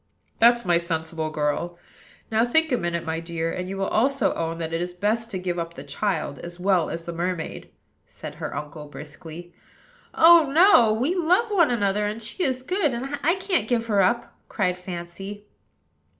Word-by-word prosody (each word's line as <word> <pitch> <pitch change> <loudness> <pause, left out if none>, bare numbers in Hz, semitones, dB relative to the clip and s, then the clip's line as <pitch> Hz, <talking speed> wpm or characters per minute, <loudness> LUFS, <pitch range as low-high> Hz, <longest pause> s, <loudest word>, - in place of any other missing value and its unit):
"That's 235 +1 +5
my 175 -2 +3
sensible 160 -2 -3
girl! 155 +3 -2 0.5
Now, 220 +1 +3
think 320 +6 +2
a 250 - +3
minute, 170 -1 -2
my 160 0 -2
dear, 165 0 -3
and 180 0 -4
you 195 - -4
will 195 - 0
also 265 +2 +2
own 165 0 -3
that 165 -1 -4
it 165 - -1
is 175 0 -4
best 215 +5 -1
to 200 - -4
give 180 -1 -3
up 170 0 -5
the 135 - -8
child 150 -1 -2
as 175 +1 -9
well 185 -3 +2
as 165 - -5
the 170 - -6
mermaid," 170 -1 -4 0.4
said - - -9
her - - -4
uncle 150 0 -7
briskly. 155 +4 -10 0.6
"Oh! 325 -3 +7
no: 315 - +6
we 250 +10 +1
love 365 +6 +2
one 345 -6 +4
another; 205 -3 +1
and 210 +2 -4
she 230 - -3
is 260 -3 -1
good, 325 -4 0
and 275 +4 -4
I 335 +5 +3
can't 375 - -1
give 230 -1 0
her 205 -3 +2
up," 235 +6 +1 0.2
cried 185 -4 0
Fancy. 185 +3 -7
195 Hz, 190 wpm, -24 LUFS, 170-245 Hz, 0.6 s, Oh